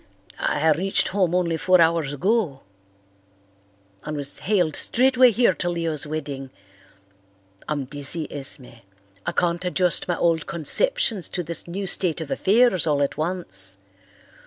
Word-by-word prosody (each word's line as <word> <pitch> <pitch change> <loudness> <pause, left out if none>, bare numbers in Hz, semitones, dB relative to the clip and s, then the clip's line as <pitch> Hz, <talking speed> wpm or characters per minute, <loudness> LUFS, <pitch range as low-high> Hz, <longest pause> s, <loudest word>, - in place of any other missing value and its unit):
"I 150 +2 0
reached 185 +6 0
home 185 -3 0
only 170 -2 0
four 185 +3 +3
hours 165 -3 +2
ago, 175 - -1 1.4
and 150 0 -5
was 145 0 -3
haled 180 -7 0
straightway 255 0 +3
here 235 -3 +2
to 175 - -3
Leo's 165 -4 0
wedding. 145 -3 -5 1.2
I'm 145 -3 -2
dizzy, 145 +3 -3
Esme. 135 -4 -9 0.5
I - - +1
can't 175 0 -1
adjust 180 0 +2
my 175 -2 -1
old 165 -2 0
conceptions 225 - 0
to 180 - -4
this 170 +1 -4
new 195 +3 -5
state 180 -3 +2
of 160 -3 -7
affairs 205 -4 +3
all 145 -2 +1
at 140 - -2
once. 100 - +1
170 Hz, 135 wpm, -23 LUFS, 150-185 Hz, 1.4 s, four